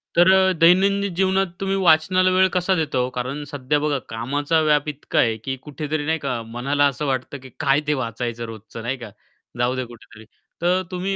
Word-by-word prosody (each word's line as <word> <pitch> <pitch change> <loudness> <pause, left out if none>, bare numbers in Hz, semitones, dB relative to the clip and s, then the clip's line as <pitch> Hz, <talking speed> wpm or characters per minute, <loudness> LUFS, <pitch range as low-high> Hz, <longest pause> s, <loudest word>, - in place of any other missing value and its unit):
तर 175 +2 +6
अ, 190 0 +5
दैनंदिन 195 +2 +4
जीवनात 190 -1 +1
तुम्ही 195 0 -1
वाचनाला 185 +1 +4
वेळ 190 0 +4
कसा 180 +1 +1
देता 155 -5 -1
हो? 125 0 +1
कारण 130 +4 -4
सध्या 145 +1 0
बघा 145 -1 0
कामाचा 145 +8 0
व्याप 150 -1 +2
इतका 145 -1 -2
आहे, 110 -2 +2
की 130 +5 -4
कुठेतरी 150 0 -4
नाही 160 +1 0
का 125 -5 -3
मनाला 145 +4 +1
असं 140 +2 -3
वाटतं, 135 +1 -2
की 130 - -11
काय 135 +1 +3
ते 150 - +2
वाचायचं 115 +1 -4
रोजचं? 110 0 -9
नाही 130 +3 -2
का 115 -3 -9 0.5
जाऊदे 125 +1 0
कुठेतरी? 115 -2 -15 0.4
तर 180 +2 +2
तुम्ही 190 +2 -2
145 Hz, 190 wpm, -22 LUFS, 125-180 Hz, 0.5 s, तर